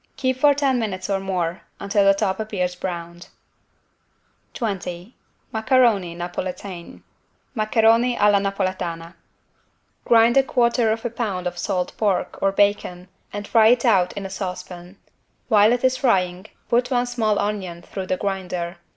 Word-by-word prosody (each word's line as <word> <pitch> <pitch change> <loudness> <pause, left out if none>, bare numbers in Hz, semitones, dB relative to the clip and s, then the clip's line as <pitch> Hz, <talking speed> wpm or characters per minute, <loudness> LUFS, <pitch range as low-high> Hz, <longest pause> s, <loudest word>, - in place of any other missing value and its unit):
Keep 260 -2 0
for 285 +1 +5
ten 270 -3 +1
minutes 200 -3 -3
or 195 - +1
more, 180 -3 -2 0.2
until 200 +1 +1
the 195 0 +5
top 195 +1 -1
appears 195 -5 -2
browned. 175 -1 -6 1.3
20 190 -2 -5 0.4
MACARONI 220 -6 +2
NAPOLITAINE 175 +1 -6 0.5
(Maccheroni 225 +2 +3
alla 205 -1 +5
Napoletana) 185 -4 -3 0.9
Grind 230 +1 +4
1/4 235 -4 +2 0.2
lb. 185 -7 -3
salt 180 0 -2
pork 205 -4 -1
or 195 - +2
bacon 195 -3 0 0.2
and 205 0 -6
fry 225 -2 +5
it 245 +2 +3
out 190 -6 +3
in 200 -1 -6
a - - -5
saucepan. 180 -1 -7 0.5
While 215 -1 +5
it 245 +1 0
is 260 0 +2
frying 185 -6 0 0.2
put 245 +1 +1
one 245 -2 +1
small 225 -4 0
onion 190 -5 -3
through 190 +1 -6
the 185 - -1
grinder. 180 -3 -4
200 Hz, 135 wpm, -22 LUFS, 180-230 Hz, 1.3 s, for